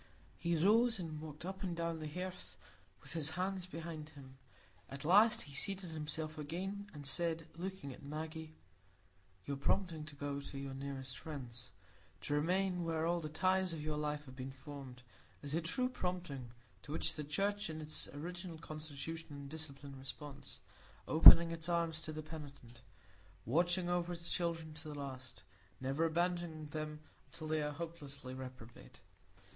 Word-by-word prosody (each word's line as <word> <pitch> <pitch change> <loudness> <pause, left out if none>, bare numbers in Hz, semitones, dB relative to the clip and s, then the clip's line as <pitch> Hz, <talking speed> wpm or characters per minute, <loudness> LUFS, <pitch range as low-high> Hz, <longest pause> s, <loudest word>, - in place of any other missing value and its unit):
He 170 0 +2
rose, 220 +8 +5
and 160 -4 -4
walked 155 +1 -7
up 190 +1 -4
and 175 -3 -2
down 170 -1 -1
the 155 - -3
hearth 150 - -5 0.5
with - - -7
his 160 -2 0
hands 185 0 0
behind 165 -3 -5
him. 135 -3 -13 0.5
At 140 +2 -6
last 205 +7 +7
he 140 - -11
seated 185 +4 -1
himself 155 0 -3
again, 190 +7 -3
and 145 -2 -8
said, 165 +3 +2
looking 185 -5 -4
at - - -12
Maggie,— 155 +2 -5 0.9
"Your 140 -1 -2
prompting 165 +2 +1
to 155 -1 -8
go 145 0 -2
to 140 0 -6
your 135 -1 -4
nearest 135 -1 -4
friends,—to 120 - -8
remain 180 +4 +2
where 165 -1 +1
all 170 +1 +2
the 155 -2 -4
ties 185 +2 +3
of 160 - -4
your 155 0 -1
life 150 0 -1
have 130 -1 -10
been 130 +1 -4
formed,—is 135 0 -10
a 165 - +2
true 250 +10 +2
prompting, 180 - -3 0.3
to 145 - -9
which 155 - +2
the 150 - -3
Church 200 +7 0
in 155 0 -4
its 155 0 -4
original 175 +3 -5
constitution 155 0 -5
and 140 -1 -7
discipline 145 -3 -6
responds, 140 +1 -8 0.5
opening 165 +1 +11
its 165 0 -2
arms 165 -2 +1
to 155 - -2
the 155 0 -4
penitent, 140 -6 -9 0.6
watching 175 - +3
over 175 0 +1
its 170 0 -3
children 165 -2 0
to 155 +1 -9
the 150 - -5
last; 130 -4 -6 0.4
never 135 +5 +1
abandoning 170 -2 0
them 155 -1 -4 0.3
until 155 - -8
they 155 0 +1
are 150 0 -1
hopelessly 145 -5 -6
reprobate. 130 -3 -9
155 Hz, 160 wpm, -37 LUFS, 140-170 Hz, 0.9 s, opening